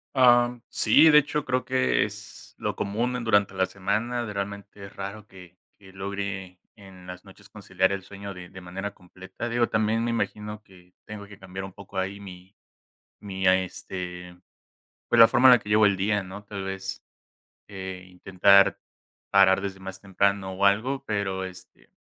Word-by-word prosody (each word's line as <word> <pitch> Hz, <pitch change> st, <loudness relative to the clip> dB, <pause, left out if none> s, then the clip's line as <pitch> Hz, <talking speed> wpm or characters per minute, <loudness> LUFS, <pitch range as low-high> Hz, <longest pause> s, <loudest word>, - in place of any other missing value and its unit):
Am, 120 Hz, -1 st, +4 dB
sí, 145 Hz, +8 st, +5 dB
de 150 Hz, 0 st, +8 dB
hecho, 150 Hz, +1 st, -2 dB
creo 125 Hz, 0 st, 0 dB
que 130 Hz, 0 st, +1 dB
es -, -, -9 dB
lo -, -, -3 dB
común, 115 Hz, +5 st, -2 dB
en 125 Hz, -, -3 dB
durante 100 Hz, -3 st, +2 dB
la 95 Hz, 0 st, +1 dB
semana. 115 Hz, +6 st, -2 dB
Realmente, 100 Hz, 0 st, -6 dB
es 100 Hz, -, -14 dB
raro 100 Hz, +2 st, -7 dB
que 90 Hz, -2 st, -15 dB, 0.2 s
que 95 Hz, -1 st, -16 dB
logre 95 Hz, -1 st, -5 dB, 0.2 s
en 95 Hz, -3 st, -15 dB
las 90 Hz, 0 st, -9 dB
noches, -, -, -17 dB
conciliar 95 Hz, +1 st, -1 dB
el 100 Hz, -1 st, -3 dB
sueño, 100 Hz, 0 st, -9 dB
de 90 Hz, -1 st, -11 dB
de 95 Hz, -, -11 dB
manera 95 Hz, +3 st, -6 dB
completa. 95 Hz, +6 st, -9 dB
Digo, 120 Hz, 0 st, +1 dB
también 110 Hz, +1 st, +1 dB
me 120 Hz, -, -1 dB
imagino, 105 Hz, -2 st, -3 dB
que 90 Hz, -2 st, -20 dB
tengo 105 Hz, -1 st, -8 dB
que 100 Hz, -1 st, -14 dB
cambiar 95 Hz, 0 st, -7 dB
un 95 Hz, -, -9 dB
poco, 100 Hz, -1 st, -11 dB
ahí, 95 Hz, +2 st, -2 dB
mi 95 Hz, 0 st, -12 dB, 0.7 s
mi, 95 Hz, -2 st, -4 dB
este, 90 Hz, -1 st, -2 dB, 0.7 s
pues, 120 Hz, -, +2 dB
la 115 Hz, -, +10 dB
forma 130 Hz, +1 st, +5 dB
en 125 Hz, -, +10 dB
la 120 Hz, -, +5 dB
que 105 Hz, -, -11 dB
llevo 105 Hz, 0 st, +5 dB
el 100 Hz, -1 st, +3 dB
día, 100 Hz, +1 st, +1 dB
¿no? 95 Hz, +2 st, -9 dB
Tal 100 Hz, -2 st, -7 dB
vez, 95 Hz, 0 st, -5 dB, 0.7 s
eh, 95 Hz, -2 st, -7 dB
intentar 95 Hz, +2 st, +4 dB, 0.5 s
parar 95 Hz, -1 st, +5 dB
desde 95 Hz, -1 st, -5 dB
más 95 Hz, 0 st, -8 dB
temprano, 100 Hz, 0 st, 0 dB
o 100 Hz, +2 st, +1 dB
algo. 125 Hz, +7 st, +1 dB
Pero, 95 Hz, -3 st, -2 dB
este, 90 Hz, -1 st, -12 dB
100 Hz, 175 wpm, -26 LUFS, 95-105 Hz, 0.7 s, la